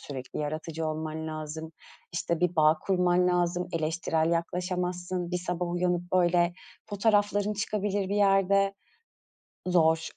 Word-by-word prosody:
sürekli 130 -3 -7
yaratıcı 155 +2 -3
olman 155 0 -4
lazım, 155 +1 -6 0.4
işte, 170 -1 -1
bir 180 -1 +1
bağ 155 0 +5
kurman 180 -1 +2
lazım, 175 0 0
eleştirel 160 0 0
yaklaşamazsın. 180 +1 -2
Bir 180 - 0
sabah 180 0 -3
uyanıp, 175 0 0
böyle, 175 -1 +3 0.3
fotoğrafların 205 0 +1
çıkabilir 205 -1 -1
bir 200 - -1
yerde. 195 0 +3 0.9
Zor. 160 -2 +3
175 Hz, 120 wpm, -28 LUFS, 160-185 Hz, 0.9 s, bağ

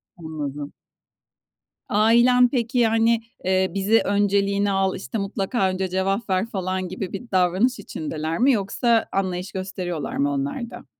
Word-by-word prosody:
Anladım. 150 -4 -6 1.2
Ailen 235 +4 +5
peki, 245 -1 -1
yani, 225 0 +3 0.2
eee, 190 0 +2
"Bizi 200 +3 +3
önceliğine 200 0 +1
al. 195 -1 +1
İşte, 195 +4 -5
mutlaka 195 +1 -1
önce 185 0 -2
cevap 195 +4 -1
ver." 190 +2 +1
falan 185 -3 -3
gibi 185 0 -5
bir 205 +4 -7
davranış 190 +7 +2
içindeler 160 -3 -4
mi 265 +4 +5
yoksa 225 +1 +1
anlayış 185 -1 -2
gösteriyorlar 185 -4 -4
mı 145 +1 +1
onlar 140 - -3
da? - - -11
195 Hz, 135 wpm, -23 LUFS, 185-225 Hz, 1.2 s, Ailen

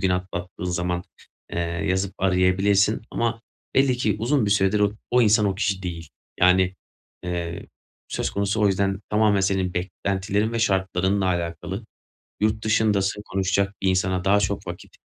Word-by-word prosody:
gün 95 - +1
atlattığın 90 0 -4
zaman, 90 0 -1 0.5
eee, - - -2
yazıp 90 +3 -1
arayabilirsin 95 +3 +2
ama 115 -1 -1 0.3
belli 135 -2 +3
ki 110 -4 0
uzun 120 +1 +1
bir - - 0
süredir 100 +1 +3
o 105 0 +3 0.2
o 125 0 +4
insan, 105 -1 +4
o 100 - 0
kişi 100 -1 -1
değil. 85 -3 -5 0.3
Yani, 90 +1 +4 0.5
eee, 85 -1 -4 0.4
söz - - -2
konusu 100 +2 -1
o - - +5
yüzden 95 0 +1
tamamen 105 -1 +3
senin 95 -1 0
beklentilerin 95 +4 -1
ve 115 - -1
şartlarınla 95 -2 +1
alakalı. 90 +3 -3 0.6
Yurt 110 +1 0
dışındasın, 105 -2 +1
konuşacak 95 +1 0
bir 95 - +2
insana 95 0 0
daha 100 +1 +4
çok 100 0 -2
vakit, 85 0 -9
95 Hz, 150 wpm, -24 LUFS, 90-105 Hz, 0.6 s, o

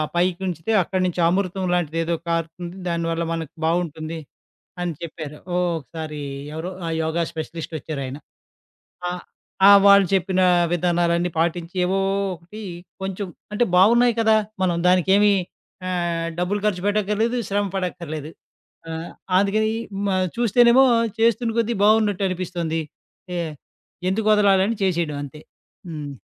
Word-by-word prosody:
పైకి 180 +1 +1
ఉంచితే 170 +3 -3
అక్కడి 185 +2 -2
నుంచి 180 0 -2
అమృతంలాంటిదేదో 175 -3 0
కారుతుంది. 165 +1 -3
దానివల్ల 170 0 -1
మనకు 165 -2 -5
బావుంటుంది 165 -1 -2 0.6
అని 175 -1 -1
చెప్పారు. 155 -2 -7 0.2
ఓ - - +1 0.2
ఒకసారి 155 +2 -7 0.4
ఎవరో 165 +3 -4 0.2
ఆ! - - -2
యోగా 160 +2 0
స్పెషలిస్టొచ్చారాయన. 155 -4 -5 0.9
ఆ - - -2 0.6
ఆ! - - +10 0.2
వాళ్ళు 200 -1 +7
చెప్పిన 185 0 +2 0.3
విధానాలన్నీ 175 0 +1
పాటించి 170 +1 -1
ఏవో 190 +2 +1 0.4
ఒకటి 180 +6 -12 0.4
కొంచెం 195 +1 -3 0.3
అంటే, 240 +3 +2
బావున్నయి 235 +6 +5
కదా! 220 -1 +4 0.3
మనం 180 -2 +2
దానికేమి 195 +3 +4 0.6
ఆహ్, 170 -2 -1
డబ్బులు 185 +4 0
ఖర్చు 190 -4 0
పెట్టక్కర్లేదు. 210 +3 +1
శ్రమ 205 +1 +1
పడక్కర్లేదు. 170 -5 -4 0.6
ఆ! - - -5 0.5
అందుకని 215 +2 +1 0.4
మా 195 - +1 0.2
చూస్తేనేమో 240 +3 +5 0.3
చేస్తున్న 230 0 +2
కొద్ది 230 +1 0
బావున్నట్టనిపిస్తంది. 185 -6 +1 0.6
ఎ - - -1 0.7
ఎందుకొదలాలని 210 0 +3
చేసేయడం 170 -6 0
అంతే. 150 +2 -10 0.5
హ్మ్. 150 -3 -6
180 Hz, 110 wpm, -22 LUFS, 165-200 Hz, 0.9 s, ఆ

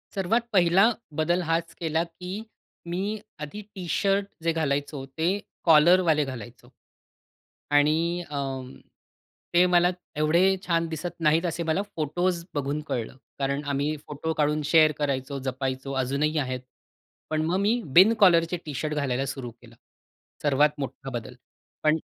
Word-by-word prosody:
सर्वात 200 +5 +1
पहिला 190 +4 +5 0.3
बदल 175 +3 +2
हाच 165 0 -1
केला 160 0 0
की 180 +2 -9 0.6
मी 180 - -1 0.4
आधी 205 +9 -8
टी-शर्ट 195 +2 0 0.2
जे 165 - +2
घालायचो 145 -3 -2
ते 160 +1 +1 0.4
कॉलरवाले 165 -1 +5
घालायचो 120 -1 -9 1.0
आणि 145 +1 +5 0.3
अ, 145 - -4 1.2
ते 175 +1 +6
मला 175 -1 +4 0.3
एवढे 155 +3 +3 0.3
छान 165 -1 +1
दिसत 160 +2 -5
नाहीत 165 +2 +3
असे 170 0 -2
मला 160 +4 +1
फोटोज् 170 +3 -1
बघून 145 +1 -2
कळलं. 120 +1 -3 0.2
कारण 140 +1 -1
आम्ही 145 +2 -1
फोटो 150 +2 -3
काढून 150 0 +1
शेअर 155 0 +5
करायचो, 140 -1 -2
जपायचो 130 +1 -3
अजूनही 140 +5 0
आहेत. 130 -2 -2 0.7
पण 155 0 0
मग 175 +3 +1
मी 220 +5 +2 0.2
बिन 195 +5 +8
कॉलरचे 175 -3 +5
टी-शर्ट 150 +1 -3
घालायला 135 -3 -1
सुरु 135 -3 -5
केलं. 115 0 -18 0.7
सर्वात 145 +1 +3
मोठा 135 -1 -5
बदल 125 0 -6 0.5
पण 155 +1 +4
155 Hz, 135 wpm, -26 LUFS, 140-170 Hz, 1.2 s, बिन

